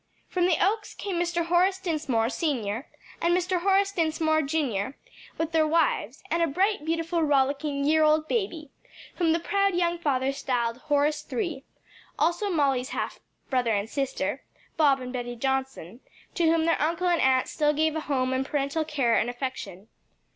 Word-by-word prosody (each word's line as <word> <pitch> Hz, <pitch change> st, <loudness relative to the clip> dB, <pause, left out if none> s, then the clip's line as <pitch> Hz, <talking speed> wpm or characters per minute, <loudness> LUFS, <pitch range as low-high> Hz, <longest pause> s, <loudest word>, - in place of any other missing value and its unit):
From 360 Hz, -1 st, +1 dB
the 345 Hz, -4 st, +3 dB
Oaks 420 Hz, +3 st, 0 dB
came 390 Hz, -4 st, -4 dB
Mr. 345 Hz, -1 st, 0 dB
Horace 360 Hz, +3 st, +3 dB
Dinsmore, 300 Hz, -11 st, 0 dB
Sr., 250 Hz, -, -2 dB, 0.3 s
and 345 Hz, +1 st, +3 dB
Mr. 360 Hz, 0 st, -1 dB
Horace 395 Hz, +1 st, +3 dB
Dinsmore, 315 Hz, -3 st, +1 dB
Jr., 275 Hz, -6 st, -1 dB, 0.4 s
with 325 Hz, 0 st, -2 dB
their 320 Hz, -1 st, +3 dB
wives 305 Hz, -6 st, 0 dB
and 335 Hz, +1 st, +1 dB
a 335 Hz, -, +3 dB
bright, 375 Hz, +3 st, 0 dB
beautiful, 330 Hz, +1 st, -1 dB
rollicking 280 Hz, 0 st, +1 dB
year 310 Hz, +1 st, +4 dB
old 310 Hz, 0 st, +3 dB
boy, 345 Hz, -, -2 dB, 0.5 s
whom 340 Hz, -3 st, +2 dB
the 330 Hz, -, +2 dB
proud 395 Hz, +2 st, +1 dB
young 345 Hz, -1 st, +1 dB
father 270 Hz, -4 st, 0 dB
styled 240 Hz, -4 st, -1 dB
Horace 295 Hz, +1 st, +1 dB
III.; 335 Hz, -, -2 dB, 0.5 s
also 350 Hz, +5 st, +1 dB
Molly's 275 Hz, -7 st, +1 dB
half -, -, -4 dB, 0.3 s
brother 245 Hz, -3 st, +2 dB
and 200 Hz, +1 st, -1 dB
sister, 275 Hz, +2 st, -2 dB, 0.3 s
Bob 280 Hz, -4 st, +3 dB
and 250 Hz, 0 st, -6 dB
Betty 245 Hz, -1 st, -4 dB
Johnson, 265 Hz, -5 st, -3 dB, 0.3 s
to 340 Hz, -, +1 dB
whom 325 Hz, 0 st, +3 dB
their 330 Hz, -3 st, +1 dB
uncle 335 Hz, +4 st, 0 dB
and 345 Hz, -2 st, +2 dB
aunt 260 Hz, -1 st, +3 dB
still 300 Hz, -1 st, +1 dB
gave 310 Hz, +1 st, +1 dB
a -, -, 0 dB
home 260 Hz, -3 st, 0 dB
and 260 Hz, +1 st, 0 dB
parental 280 Hz, +3 st, -1 dB
care 275 Hz, -7 st, +1 dB
and 240 Hz, -, 0 dB
affection. 245 Hz, -6 st, -6 dB
305 Hz, 170 wpm, -26 LUFS, 265-340 Hz, 0.5 s, year